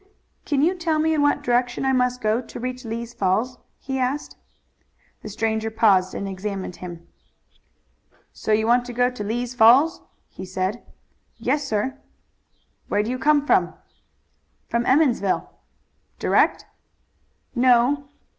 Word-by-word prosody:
"Can 285 -1 +1
you 345 +4 +3
tell 335 -4 -1
me 320 +1 +2
in 305 - +1
what 290 0 +2
direction 245 +1 0
I 265 - +2
must 250 -1 +1
go 215 +3 +1
to 245 - -10
reach 255 +1 -5
Lee's 230 +1 -5
Falls?" 215 +7 0 0.2
he 265 0 -4
asked. 260 +3 -2 0.9
The - - -8
stranger 220 +1 -1
paused 205 -5 +3
and 200 - -4
examined 195 -1 -5
him. 170 -2 -9 1.3
"So - - -4
you 215 +1 +3
want 240 +2 +3
to 245 - -7
go 245 +1 +2
to 250 -4 -6
Lee's 240 +4 -3
Falls?" 250 +8 +5 0.3
he - - -10
said. 190 +4 -3 0.6
"Yes, 290 -1 -1
sir." 260 +4 -2 0.9
"Where 205 - +1
do 225 - -3
you 255 - -3
come 290 0 +3
from?" - - +2 0.9
"From 235 +1 0
Emmonsville." 255 -9 +2 0.7
"Direct?" - - +2 0.9
"No." 255 +3 +3
245 Hz, 140 wpm, -23 LUFS, 215-265 Hz, 1.3 s, Falls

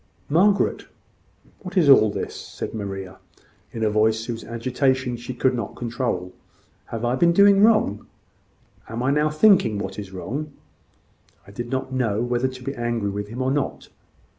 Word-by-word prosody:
"Margaret, 195 +6 +2 0.7
what 190 0 -7
is 170 -5 +4
all 130 -6 +7
this?" - - -4
said - - -7
Maria, 95 -3 -6 0.5
in 115 - -4
a 110 - +3
voice 110 +1 +2
whose 115 -1 -5
agitation 125 +2 -1
she 120 +2 -7
could 130 +1 +1
not 115 -4 -4
control. 120 -7 -3 0.5
"Have 115 +1 -4
I 120 - +1
been 170 +6 +3
doing 200 +1 +6
wrong? 215 - +3 0.8
Am 115 +2 -4
I 135 - +2
now 150 +1 +2
thinking 155 - +4
what 100 - -5
is 100 -2 -8
wrong? 140 +11 -5 0.9
I 100 - -14
did 120 +4 -6
not 130 0 -3
know 115 -5 0
whether 120 +2 0
to 130 -1 -9
be 135 - -3
angry 120 -4 -2
with 100 +1 -4
him 120 +5 -4
or 130 - 0
not. 145 0 -2
120 Hz, 165 wpm, -23 LUFS, 110-140 Hz, 0.9 s, all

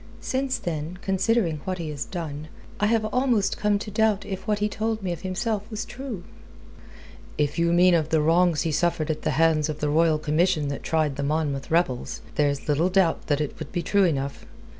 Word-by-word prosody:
Since 265 -1 -1
then, 165 -1 -4
considering 190 -3 +1
what 185 -1 -3
he 165 -3 -4
has 145 -2 -4
done, 155 -4 -5 0.3
I 210 - +3
have 220 0 +2
almost 250 -5 +1
come 210 -1 +2
to 210 +1 -6
doubt 215 -1 +2
if 190 +2 -6
what 210 -1 +2
he 210 0 +1
told 220 0 -2
me 185 - -1
of 165 - -8
himself 205 +3 -2
was 215 -1 -4
true." 240 -7 -7 1.1
"If 150 +2 0
you 170 0 +3
mean 180 +1 +5
of 160 -2 +2
the 160 - +3
wrongs 165 +1 +3
he 165 - -1
suffered 160 -1 +1
at 155 - -4
the - - -1
hands 160 -2 +3
of 150 -1 -4
the 150 - 0
Royal 160 +1 +3
Commission 155 0 +1
that 140 - -4
tried 155 -4 0
the 140 - -2
Monmouth 145 -2 -1
rebels, 160 -7 0
there's 145 -2 0
little 155 +4 +2
doubt 185 -3 +2
that 145 -1 +1
it 150 - -4
would - - -7
be 175 -2 -2
true 200 +3 +3
enough. 140 -4 -2
170 Hz, 205 wpm, -25 LUFS, 155-205 Hz, 1.1 s, mean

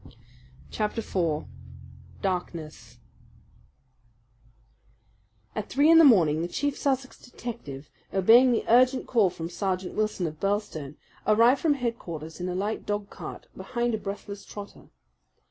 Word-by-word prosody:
Chapter 215 +1 -2
4 165 -7 -1 0.8
Darkness 175 -5 -4 2.6
At 215 - -4
three 290 +4 +4
in 330 - +8
the - - +8
morning 165 - +5
the 170 - -1
chief 285 +9 -2
Sussex 265 -2 -2
detective, 220 - -8 0.2
obeying 230 +7 +6
the 235 - 0
urgent 255 +3 +4
call 220 -6 +3
from 165 -1 -6
Sergeant 185 +1 -3
Wilson 215 -4 -1
of 155 -1 -5
Birlstone, 195 -8 -2 0.3
arrived 230 +5 +5
from 305 -3 +3
headquarters 170 - -5
in 180 - -2
a 180 - -3
light 205 +4 -2
dog 205 -1 -3
cart - - -8
behind 240 -1 -2
a 220 - -1
breathless 200 0 -7
trotter. 205 -1 -10
205 Hz, 130 wpm, -27 LUFS, 175-240 Hz, 2.6 s, in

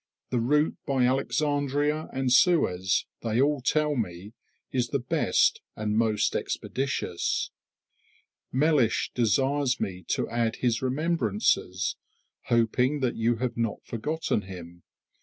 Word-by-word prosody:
The 125 - +1
route 150 +6 +2
by 135 -3 +2
Alexandria 145 +3 0
and 130 -1 0
Suez, 100 - +3 0.2
they 115 0 0
all 145 0 +2
tell 150 +3 +1
me, 100 -3 -4 0.4
is 125 -2 0
the 140 - 0
best 125 -2 +2
and 105 0 -2
most 110 -2 +1
expeditious. 135 -10 -2 1.0
Mellish 140 -4 +2
desires 130 +3 +1
me 90 -1 -3
to - - 0
add 115 -1 0
his 120 -2 0
remembrances, 125 - 0 0.5
hoping 125 +4 +1
you 115 +1 +1
have 120 +1 -3
not 115 -2 -2
forgotten 150 +1 -2
him. 85 -2 -10
125 Hz, 115 wpm, -27 LUFS, 110-145 Hz, 1.0 s, Suez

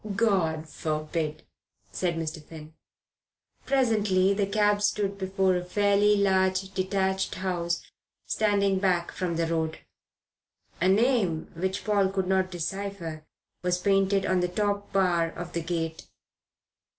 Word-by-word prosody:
"God 170 -8 +1
forbid," 155 0 -3 0.5
said 175 -2 -1
Mr. 160 -1 -4
Finn. 155 0 -11 0.9
Presently 210 -8 +3
the 200 0 0
cab 205 0 +2
stopped 205 -1 0
before 190 -1 +1
a 180 - -1
fairly 205 +2 +3
large 190 -1 +2
detached 190 0 0
house 175 -2 -2 0.4
standing 200 -2 +1
back 180 -3 +1
from 180 -3 -2
the 165 0 +1
road. 160 -1 -1 1.0
A 180 - +3
name 200 -5 +2
which 190 +3 -2
Paul 200 -3 +2
could 190 -1 -1
not 190 0 +2
decipher 175 -3 -5 0.3
was 180 0 +1
painted 195 +1 +2
on 185 -1 +2
the 180 - +1
top 205 +2 -2
bar 180 -4 +2
of 175 0 -7
the 170 - -1
gate. 165 -1 -3
190 Hz, 125 wpm, -27 LUFS, 170-200 Hz, 1.0 s, Presently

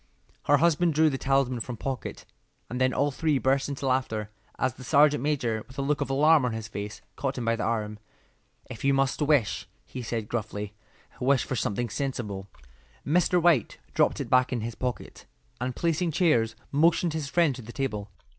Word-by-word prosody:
Her 145 - +5
husband 170 +1 +3
drew 155 0 +4
the 135 - -3
talisman 135 -2 +1
from 120 +1 -5
pocket, 130 +2 -5 0.5
and 125 +1 -3
then 130 0 +4
all 145 +2 +1
three 155 +1 +1
burst 135 +1 +1
into 140 -1 -4
laughter 115 -5 -1 0.3
as 130 -2 0
the 130 - -12
sergeant 145 0 +4
major, 125 -7 0
with 130 - -15
a 140 - -1
look 145 +1 0
of - - -1
alarm 150 +2 +5
on 125 -2 0
his 110 -1 -5
face, 105 -1 -6
caught 135 -1 -2
him 120 - -3
by 115 0 +2
the 115 - -4
arm. 105 -2 -2 0.7
"If 110 - -9
you 140 0 +3
must 135 +2 +1
wish," 130 - +1 0.2
he 130 - -7
said, 115 -2 -3
gruffly, 105 -3 -4 0.5
"wish 130 +1 +3
for 130 - -3
something 120 -1 -1
sensible." 110 -8 -3 0.6
Mr. 180 +3 +3
White 165 -9 +3 0.2
dropped - - +2
it - - -3
back 130 0 +3
in 120 -3 -1
his 115 +2 -4
pocket, 125 +1 -5 0.3
and 125 0 -3
placing 170 +1 0
chairs, 120 -10 +2 0.2
motioned 165 +3 +3
his 155 -3 -3
friend 165 -2 +3
to 125 - -8
the 115 +1 -10
table. 110 -6 -3
130 Hz, 195 wpm, -27 LUFS, 115-145 Hz, 0.7 s, Her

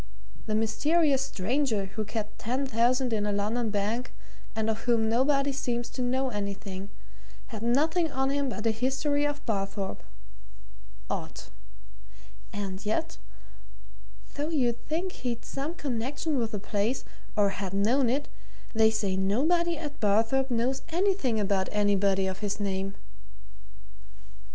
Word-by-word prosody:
The 215 - +1
mysterious 275 +6 +3
stranger 240 -2 0
who 195 +3 -4
kept 215 0 -4
ten 255 +5 -1
thousand 250 +1 +2
in 210 -1 +1
a - - +1
London 215 +3 0
bank, 215 +4 -1 0.4
and 220 0 0
of 220 0 -1
whom 230 -2 +3
nobody 275 +4 +3
seems 240 -3 -2
to 255 - -4
know 260 +2 +1
anything, 200 -2 -4 0.6
had 220 -3 -6
nothing 310 +8 +2
on 265 0 +1
him 280 -1 +1
but 230 -2 -4
a 225 - +4
history 270 +5 +1
of 290 0 -4
Barthorpe. 195 -2 -2 1.1
Odd! - - -4 1.1
And 195 -1 -4
yet, 210 - -1 1.1
though 295 +2 -2
you'd 245 -7 +1
think 345 +5 -1
he'd 245 -8 -4
some 290 +5 -3
connection 280 +2 -1
with 230 -2 0
the 210 - -1
place, 210 +5 -1 0.3
or 205 -2 +4
had 195 -1 -3
known 230 +6 +3
it, 280 +4 0 0.5
they 220 -1 +6
say 210 -4 0
nobody 310 - +2
at 295 -2 -6
Barthorpe 225 +6 +3
knows 250 +3 +1
anything 345 - +2
about 195 -2 +1
anybody 200 -2 +3
of 190 0 -3
his 205 0 -2
name." 195 -1 -2
230 Hz, 135 wpm, -29 LUFS, 205-275 Hz, 1.1 s, they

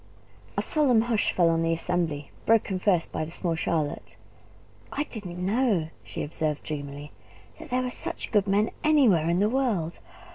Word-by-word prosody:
A - - +1
solemn 275 -8 +3
hush 230 -3 +1
fell 175 -2 +3
on 165 0 +1
the 165 0 +2
assembly, 165 -4 -2 0.2
broken 215 -4 +3
first 180 -3 +1
by - - -2
the 155 - -6
small 170 0 -2
Charlotte. 160 -2 -2 0.8
"I 290 - -1
didn't 205 -11 -5
know," 195 -3 +1
she - - -5
observed 150 0 -2
dreamily, 145 -1 -6 0.5
"that 315 - -10
there 255 0 +1
were 250 - -2
such - - -2
good 205 -2 +3
men 205 +2 +2
anywhere 240 - +4
in 170 - +2
the 205 - +4
world. 215 -10 0
180 Hz, 170 wpm, -27 LUFS, 160-225 Hz, 0.8 s, anywhere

